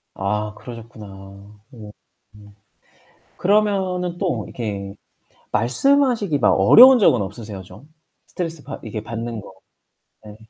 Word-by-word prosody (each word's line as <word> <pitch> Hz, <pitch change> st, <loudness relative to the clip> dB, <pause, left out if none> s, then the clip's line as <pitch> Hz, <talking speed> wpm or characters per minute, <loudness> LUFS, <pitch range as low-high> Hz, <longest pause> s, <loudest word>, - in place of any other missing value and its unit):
아 105 Hz, +2 st, -3 dB
그러셨구나. 115 Hz, -3 st, -11 dB, 0.7 s
음. 105 Hz, -3 st, -11 dB, 1.5 s
그러면은 190 Hz, -3 st, 0 dB
또 180 Hz, -4 st, -2 dB
이렇게 100 Hz, -4 st, -6 dB, 0.6 s
말씀하시기 220 Hz, -, +2 dB
막 -, -, +3 dB
어려운 245 Hz, -, +7 dB
적은 130 Hz, -, +3 dB
없으세요 100 Hz, -1 st, -8 dB
좀? 135 Hz, +10 st, -16 dB, 0.4 s
스트레스 165 Hz, -4 st, -6 dB
받 -, -, -9 dB
이렇게 110 Hz, -1 st, -6 dB
받는 115 Hz, 0 st, -6 dB
거. 100 Hz, -, -13 dB, 0.7 s
예. 105 Hz, -, -11 dB
120 Hz, 245 characters per minute, -20 LUFS, -, 1.5 s, 어려운